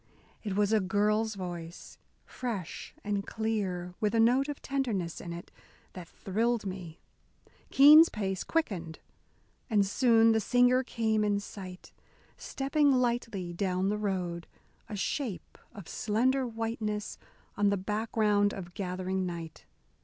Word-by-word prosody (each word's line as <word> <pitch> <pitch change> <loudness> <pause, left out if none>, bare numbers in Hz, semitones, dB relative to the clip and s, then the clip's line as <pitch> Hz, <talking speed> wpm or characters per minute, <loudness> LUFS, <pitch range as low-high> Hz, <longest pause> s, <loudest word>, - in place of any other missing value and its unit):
It 205 -3 -3
was 205 +1 +2
a 220 - +5
girl's 210 +3 +1
voice, 175 -3 -7 0.3
fresh 225 -9 -5
and 205 -1 -1
clear, 195 -6 -2
with 215 +1 0
a - - +3
note 250 +5 +4
of 290 - -4
tenderness 230 -12 -2
in 170 - -7
it 170 0 -8 0.4
that 180 -2 -9
thrilled 225 +5 -1
me. 180 -4 -7 0.7
Keene's 300 +4 +8
pace 195 -3 -3
quickened. 185 - -2 0.7
And 205 -3 +3
soon 225 +2 +4
the 220 - +3
singer 245 +3 +4
came 220 -3 0
in 205 -1 +1
sight, 185 -2 -10 0.4
stepping 285 +1 +1
lightly 235 -8 0
down 185 +1 0
the 210 - 0
road, 180 -4 -2 0.4
a 215 - -4
shape 210 0 -3 0.2
of 200 -5 -11
slender 255 +5 +1
whiteness 225 -2 -3 0.4
on 205 0 +3
the 200 - +1
background 210 0 +1
of 175 -2 -8
gathering 185 0 -2
night. 165 -2 -7
210 Hz, 130 wpm, -30 LUFS, 185-230 Hz, 0.7 s, Keene's